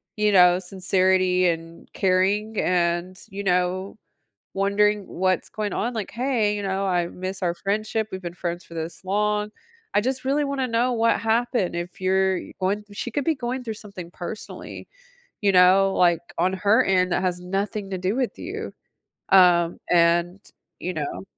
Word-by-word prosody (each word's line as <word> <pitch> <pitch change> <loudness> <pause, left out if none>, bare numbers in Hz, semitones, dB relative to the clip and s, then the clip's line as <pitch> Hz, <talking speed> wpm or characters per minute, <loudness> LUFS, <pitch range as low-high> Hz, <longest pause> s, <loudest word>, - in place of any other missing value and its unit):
you 210 -1 +2
know, 180 -2 +6
sincerity, 185 0 +2
and 165 0 -4
caring 200 +3 +1
and, 175 +1 0
you 200 0 -6
know, 185 +1 0 0.6
wondering 200 +1 +1
what's 185 -1 -1
going 210 -1 -3
on, 240 +3 -1
like, 220 -4 -4
"Hey," 235 -4 0
you 205 - -4
know, 195 0 -1
"I 175 -2 +1
miss 185 +2 -6
our 170 -1 +1
friendship, 215 +4 -2
we've 190 - -6
been 175 -2 -6
friends 175 0 -4
for 170 - -14
this 165 +2 -6
long. 210 +2 0 0.4
I 205 - +3
just 260 +2 -2
really 285 +3 +1
wanna 275 -2 -1
know 240 +2 +1
what 230 0 +2
happened, 225 -5 0
if 175 +2 -6
you're 190 0 +2
going" 200 +3 -2
she 220 +4 -5
could 280 +4 -1
be 325 - +2
going 250 0 -4
through 225 -2 -4
something 200 -5 -10
personally, 180 +5 -8 0.5
you 200 -2 +3
know? 190 +1 +5
Like, 175 -2 +4 0.2
on 185 - +1
her 200 +3 +3
end 185 -1 +2
that - - +1
has 180 -1 -1
nothing 195 +2 -3
to 190 - -2
do 185 +5 -1
with 255 -2 -2
you. - - -6 0.6
Um, 175 -3 +5
and, 175 +1 +3 0.4
you 180 - -3
know. 150 +3 -4
190 Hz, 170 wpm, -24 LUFS, 180-210 Hz, 0.6 s, know